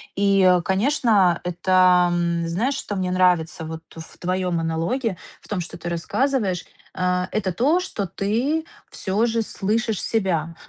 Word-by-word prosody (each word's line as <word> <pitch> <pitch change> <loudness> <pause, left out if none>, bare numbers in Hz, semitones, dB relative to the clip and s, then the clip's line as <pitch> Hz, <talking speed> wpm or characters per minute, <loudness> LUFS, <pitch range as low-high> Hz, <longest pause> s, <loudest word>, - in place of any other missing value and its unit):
И, 195 -2 +4
конечно, 200 - +2
это, 180 0 +3
м, 170 -1 0
знаешь, 225 +12 0
что 205 - -4
мне 185 -1 -1
нравится 175 -3 +1
вот 160 0 -6
в 160 -1 -11
твоём 180 -1 -1
монологе, 170 +7 -1 0.2
в - - -18
том, 205 - -2
что 170 -1 -6
ты 175 0 -5
рассказываешь- 190 - -1 0.3
э, 180 0 0
это 200 -3 -1
то, 285 - +2
что 205 - -4
ты 240 - -1 0.3
всё 200 +4 0
же 230 0 0
слышишь 220 +1 -1
себя. 170 -7 0
185 Hz, 145 wpm, -22 LUFS, 175-220 Hz, 0.3 s, И